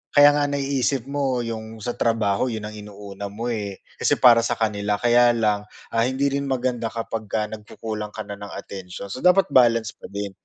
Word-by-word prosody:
Kaya 145 0 +9
nga 145 0 +1
naiisip 135 -2 -1
mo 135 -4 0
’yong 110 -1 -6
sa 120 - -1
trabaho 115 -2 +1
’yon 110 -3 -4
ang 105 - -5
inuna 105 -1 -8
mo 115 +4 -4
eh, 100 -4 -5 0.2
kasi - - +3
para 120 -2 +7
sa 120 +1 0
kanila, 105 -2 0
kaya 120 +2 +4
lang, 105 -2 0 0.2
ah, 115 - +2
hindi 135 +2 0
rin 140 0 -1
maganda 125 -3 -1
kapagka 110 -2 -3
nagkukulang 105 0 -6
ka 110 - -4
na 100 -1 -8
ng 100 - -7
atensyon. 95 0 -8
So 130 - -5
dapat 180 +1 +4
balance 115 -4 +4
pa - - -12
din. 100 0 -5
115 Hz, 190 wpm, -23 LUFS, 105-125 Hz, 0.2 s, Kaya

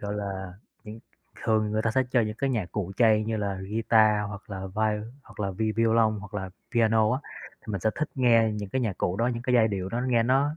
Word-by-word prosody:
gọi 100 0 -4
là, 95 -2 -5 0.3
những 110 +1 -9 0.5
thường 110 -1 +2
người 110 0 0
ta 115 - +1
sẽ 130 +4 +2
chơi 125 -4 +3
những 105 0 -4
cái 135 - 0
nhạc 105 -8 -2
cụ 95 -3 -3
chay 110 -2 +4
như 110 0 -2
là 100 -2 -2 0.2
guitar 110 -1 +3
hoặc 100 0 -10
là 95 -1 -5
vai 110 -1 +1 0.2
hoặc - - -13
là 100 -1 -1
vi 110 +3 -1
vi 115 +1 +1
violon 110 -1 +3
hoặc 100 +2 -11
là 95 -2 -4 0.2
piano 110 -2 +3
á, 130 - -1 0.4
thì 110 - -7
mình 100 - -2
sẽ 110 - +2
thích 155 - -2
nghe 115 -4 +4
những 105 -1 -5
cái 130 - 0
nhạc 110 -7 -2
cụ 90 - 0
đó, 115 +3 +1
những 120 -1 -2
cái 125 -1 0
giai 115 -2 +5
điệu 95 -3 -3
đó 115 +5 -2
nghe 120 -2 +3
nó, 135 +5 +2
110 Hz, 255 wpm, -27 LUFS, 105-115 Hz, 0.5 s, giai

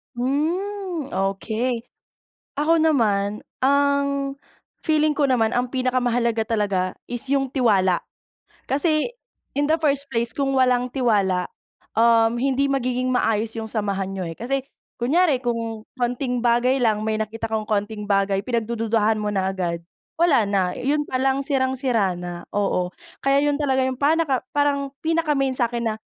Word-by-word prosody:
Hmm 335 +5 -2
okey. 220 +5 -1 0.7
Ako 320 +2 +3
naman, 210 -9 +1 0.2
ang 280 0 +2 0.5
feeling 310 -1 +2
ko 285 -2 +1
naman 230 -3 +2
ang 245 0 0
pinakamahalaga 245 -3 +1
talaga 200 -4 -1
is 245 -1 -4
yung 270 -1 0
tiwala. 195 -9 +3 0.7
Kasi 305 - +2 0.5
in 285 - +2
the 315 +2 +1
first 285 -2 +1
place 230 0 -1
kung 275 -1 0
walang 250 -1 +2
tiwala, 200 -8 +1 0.5
um, 230 0 +4
hindi 275 +2 +1
magiging 255 -1 0
maayos 225 -3 0
yung 225 - -3
samahan 200 -3 -2
niyo 185 -3 -4
eh, 165 - -7
kasi 270 +4 -1 0.4
kunyari 290 +2 +3
kung 230 -2 -2 0.2
konting 245 0 -1
bagay 240 +2 +3
lang 220 -5 +2
may 215 0 -1
nakita 225 +1 -3
kong 220 -1 -1
konting 210 0 -2
bagay 195 -1 +1
pinagdududuhan 225 -2 0
mo 210 - -1
na 190 -1 0
agad 170 -3 -3 0.3
wala 290 -11 +3
na 190 -3 +1
yun 295 +7 0
palang 265 +1 0
sirang-sira 260 - +1
na 175 0 -7
oo 195 -3 0 0.3
kaya 275 +1 +3
yun 290 0 +1
talaga 265 -2 +2
yung 260 0 -3
pan 300 +3 +4 0.9
pinaka-main 300 -5 +1
sakin 240 -2 -1
na - - -4
245 Hz, 140 wpm, -23 LUFS, 215-275 Hz, 0.9 s, um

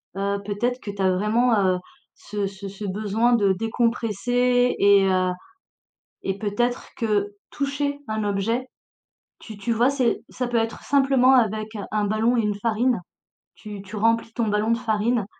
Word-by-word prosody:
Heu, 200 +1 -1
peut-être 240 +5 -1
que 210 - -8
tu 200 -1 -6
as 190 -1 +3
vraiment, 220 +4 +2
heu, 185 -1 +2 0.4
ce 205 -1 -4
ce 195 0 -8
ce 200 +2 -8
besoin 215 +4 +1
de 200 -4 +3
décompresser 240 +3 +1
et 200 -1 +5
heu 185 -1 +2 0.9
et 195 0 -2
peut-être 235 +4 -1
que 205 -3 0 0.2
toucher 285 0 -2
un 215 -1 -2
objet, 210 +5 -1 0.7
tu 215 -3 -10
tu 220 +4 -4
vois? 235 +3 +3
C'est 260 -4 0
ça 250 -1 -3
peut 240 - -1
être 225 0 -1
simplement 270 -2 +4
avec 215 -3 +2 0.2
un 210 -1 +1
ballon 220 +4 +1
et - - +3
une 210 -1 -1
farine. 230 +2 +1 0.6
Tu 210 -2 -9
tu 200 +2 -9
remplis 230 +1 +1
ton 230 -2 -1
ballon 210 +2 +1
de 230 - +2
farine 225 -1 0
220 Hz, 165 wpm, -23 LUFS, 205-245 Hz, 0.9 s, et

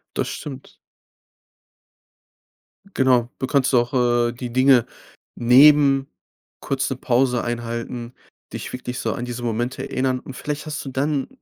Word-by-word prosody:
Das - - -1
stimmt. 135 -3 -8 2.2
Genau, 125 -3 +2
du 130 - -2
kannst 140 -2 +1
auch, 120 +1 +2
äh, 120 -2 +2
die 125 0 -7
Dinge 130 -1 +4 0.5
neben 135 +2 +5 0.5
kurz 135 -1 -1
'ne 135 - -2
Pause 125 -1 +1
einhalten, 120 0 -5 0.4
dich - - -6
wirklich 125 -1 -5
so 110 - -1
an 120 +6 -5
diese 120 0 -6
Momente 120 +2 -2
erinnern. 130 0 0
Und 130 +1 -10
vielleicht 150 +1 -5
hast 150 -1 -5
du - - -5
dann 135 +1 -1
125 Hz, 135 wpm, -22 LUFS, 120-135 Hz, 2.2 s, neben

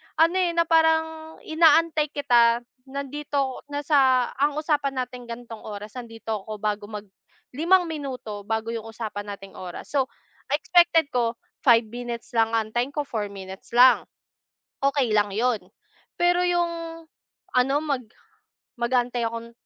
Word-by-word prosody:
ano 330 +3 +4
eh, 355 -2 +2
na 335 - +4
parang 320 -1 +2
inaantay 320 -1 +4
kita, 240 -4 +4 0.3
nandito 280 -1 -3
na 290 - -1
sa 265 -4 +4
ang 290 +1 +2
usapan 285 -4 0
nating 250 0 -7
gantong 235 -1 -8
oras 210 +2 -8
andito 225 -4 -5
ako 215 -1 -6
bago 210 -1 -1
mag-limang 280 - -1
minuto 255 -9 -5
bago 220 +1 -2
yung 225 -1 -5
usapan 215 -2 -6
nating 195 -1 -10
oras. 180 -1 -8
So 270 -3 +1 0.4
expected 330 +1 +4
ko, 235 -1 0 0.2
5 235 -5 +5
minutes 240 +3 -6
lang 225 0 +3
antayin 230 +4 0
ko 295 - -1
4 215 -3 -2
minutes 190 +1 -10
lang, 250 +1 +7 0.8
okey 275 -4 +2
lang 205 -1 +2
yun. 235 +3 +2 0.6
Pero 350 0 +4
yung, 350 -1 +2 0.9
ano 255 +2 +3
mag 275 -5 -1 0.8
mag-antay 240 -1 +1
akong 230 0 -7
250 Hz, 135 wpm, -25 LUFS, 225-295 Hz, 0.9 s, lang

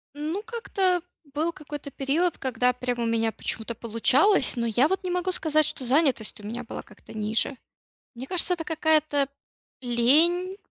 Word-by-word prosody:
Ну, 310 +7 -3
как-то 390 -6 0 0.3
был 320 +3 0
какой-то 295 -2 -8
период, 300 +7 0
когда 250 -1 +1
прям 250 -1 -3
у 235 - -1
меня 225 -1 0
почему-то 225 +1 -4
получалось, 250 - +3
но 235 -1 -2
я 240 +6 +2
вот 380 +2 -2
не 360 - -3
могу 360 +1 -1
сказать, 310 -3 +2
что 265 - -2
занятость 260 -5 +1
у - - -14
меня 235 +3 -5
была 230 - -7
как-то - - -16
ниже. 220 +5 +1 0.6
Мне 260 +3 -8
кажется, 360 0 +3
это 335 - -4
какая-то 310 -3 +2 0.5
лень, 315 +11 +2
285 Hz, 160 wpm, -25 LUFS, 240-340 Hz, 0.6 s, получалось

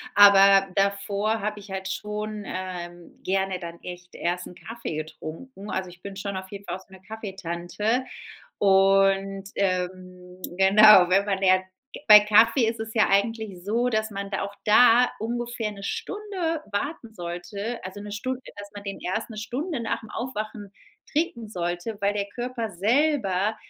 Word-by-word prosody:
aber 195 -1 +7
davor 200 +2 0
habe 210 0 -3
ich 200 - -13
halt 190 0 -4
schon, 210 +2 -4
ähm, 175 -2 -7
gerne 190 -1 0
dann 170 -1 -8
echt 180 0 -9
erst 175 +1 -2
'n 180 - -12
Kaffee 225 -8 -7
getrunken. 160 +8 -8
Also, 185 -2 -3
ich 175 - -17
bin 200 0 -8
schon 200 0 -4
auf 190 0 -7
jeden 200 0 -9
Fall 175 - -3
auch - - -14
so - - -29
'ne 190 - -13
Kaffeetante 205 +2 -3 0.6
und, 195 0 +3
ähm 185 -1 -3 0.2
genau, 195 -1 +8
wenn 195 +2 +3
man 195 -2 -1
lernt 185 -1 +3 0.4
bei 210 -1 +10
Kaffee 225 +3 +4
ist 230 - -3
es 220 0 -6
ja 220 - +4
eigentlich 200 -2 0
so, 235 +5 +1
dass 220 -1 -1
man 200 0 -5
da 195 - -2
auch 200 0 -5
da 245 +3 +6
ungefähr 235 -1 -3
'ne 200 -1 -11
Stunde 360 - -3
warten 230 +1 -4
sollte, 200 +6 -5
also, 190 +2 -7
'ne 205 0 -8
Stund 255 +4 -4 0.2
dass 205 0 -8
man 205 0 -9
den 195 0 -6
erst 215 +6 -3
'ne 215 - -8
Stunde 270 +6 -3
nach'm 225 0 -4
Aufwachen 215 -4 -5 0.4
trinken 270 -8 -1
sollte, 175 +2 -3
weil 200 +1 +2
der 200 -1 -2
Körper 240 -2 -4
selber 215 - +1
200 Hz, 165 wpm, -25 LUFS, 190-220 Hz, 0.6 s, bei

